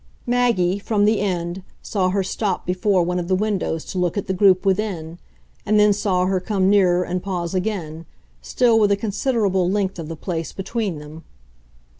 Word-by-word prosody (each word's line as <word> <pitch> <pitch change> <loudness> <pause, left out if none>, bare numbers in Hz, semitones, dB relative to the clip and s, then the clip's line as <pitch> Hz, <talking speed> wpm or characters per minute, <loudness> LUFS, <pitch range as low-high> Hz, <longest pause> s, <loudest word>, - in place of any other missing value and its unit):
Maggie, 235 -7 +1
from 205 0 +1
the 215 0 +3
end, 180 -2 -2 0.2
saw 190 -4 0
her 195 +1 0
stop 195 +2 -2
before 185 +1 +1
one 180 +1 -1
of 175 - -4
the 185 - +2
windows 195 -5 -1
to 185 - -4
look 180 +1 0
at 200 - -2
the 190 - -2
group 185 0 +4
within, 185 -5 -1 0.4
and 210 +1 +2
then 210 0 +5
saw 190 -3 0
her 190 0 +1
come 190 0 +1
nearer 180 -3 +4
and 180 0 -3
pause 175 -3 -3
again, 180 -5 -3 0.3
still 235 -3 +2
with 205 -2 +3
a 200 - +3
considerable 200 -3 0
length 195 -2 -1
of 160 - -6
the 165 - -6
place 165 0 -4
between 195 -2 -3
them. 150 +2 -11
190 Hz, 185 wpm, -21 LUFS, 180-205 Hz, 0.4 s, then